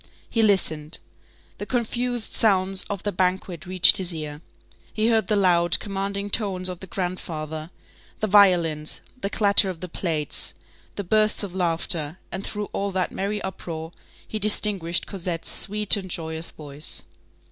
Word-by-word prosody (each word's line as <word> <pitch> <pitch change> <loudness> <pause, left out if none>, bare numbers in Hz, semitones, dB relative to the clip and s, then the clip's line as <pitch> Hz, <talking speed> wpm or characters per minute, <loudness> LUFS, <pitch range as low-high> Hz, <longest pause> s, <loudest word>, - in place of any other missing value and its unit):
He 230 - 0
listened. 165 -7 +2 0.6
The 205 - -5
confused 245 -1 -1
sounds 195 -3 +3
of 200 -3 -4
the 205 - -1
banquet 180 -2 -1
reached 185 -1 +6
his 185 -2 +3
ear. 150 -1 -6 0.5
He 220 +1 +1
heard 225 -1 +2
the 215 - +2
loud, 175 -4 +3
commanding 200 0 -4
tones 190 -4 +1
of 180 -1 -6
the 190 - -10
grandfather, 160 -4 -4 0.5
the - - 0
violins, 175 -7 +3 0.2
the 195 - -1
clatter 200 -1 +4
of 180 -3 -6
the 180 - -6
plates, 160 -4 -1 0.4
the 200 - -3
bursts 215 +3 +3
of 195 -3 -6
laughter, 165 -3 0
and 190 - -4
through 210 -1 -4
all 200 0 -1
that 185 -2 -1
merry 205 +2 -3
uproar, 165 -4 -6 0.4
he 215 - -4
distinguished 200 -5 0
Cosette's 175 -3 -2
sweet 210 +1 +3
and 190 -2 -6
joyous 160 -1 -3
voice. 145 0 -2
185 Hz, 150 wpm, -24 LUFS, 170-205 Hz, 0.6 s, reached